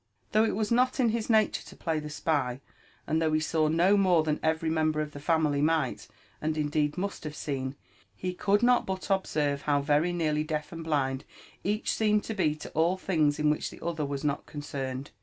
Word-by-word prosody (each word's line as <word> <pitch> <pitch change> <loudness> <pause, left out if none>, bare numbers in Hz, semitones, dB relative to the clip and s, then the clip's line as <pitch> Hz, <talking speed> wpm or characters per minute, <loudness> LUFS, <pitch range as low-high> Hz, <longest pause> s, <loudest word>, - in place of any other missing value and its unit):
Though 215 +1 +4
it - - 0
was 215 +1 -1
not 255 +4 +2
in 245 -3 +4
his 225 0 -2
nature 220 -2 +3
to - - -13
play 160 -2 -1
the 150 0 -6
spy, 145 -5 -1 0.5
and 160 +1 0
though 160 -1 +2
he 155 - +3
saw 155 0 +1
no 170 +6 +4
more 185 -5 +4
than 155 -1 -1
every 160 0 0
member 155 -1 +1
of 150 -1 -2
the 145 - -9
family 150 -2 +1
might, 155 -4 0 0.3
and 155 0 -1
indeed 150 0 0
must 195 +2 -3
have 150 -1 -6
seen, 135 -2 -3 0.4
he 180 - -3
could 205 +4 +1
not 245 0 +4
but 190 +1 -3
observe 150 -7 0
how 145 -1 +2
very 150 +4 +2
nearly 155 -3 0
deaf 155 -1 -3
and 165 -1 -6
blind 140 -4 0 0.4
each 210 +3 0
seemed 210 -1 +2
to 225 - -4
be 155 -7 +1
to 155 - -9
all 170 +4 +2
things 155 -6 +1
in 150 0 +3
which 150 - -2
the - - -11
other 165 -3 -1
was 140 -1 -3
not 145 -1 -1
concerned. 135 -2 -5
155 Hz, 215 wpm, -28 LUFS, 150-185 Hz, 0.5 s, Though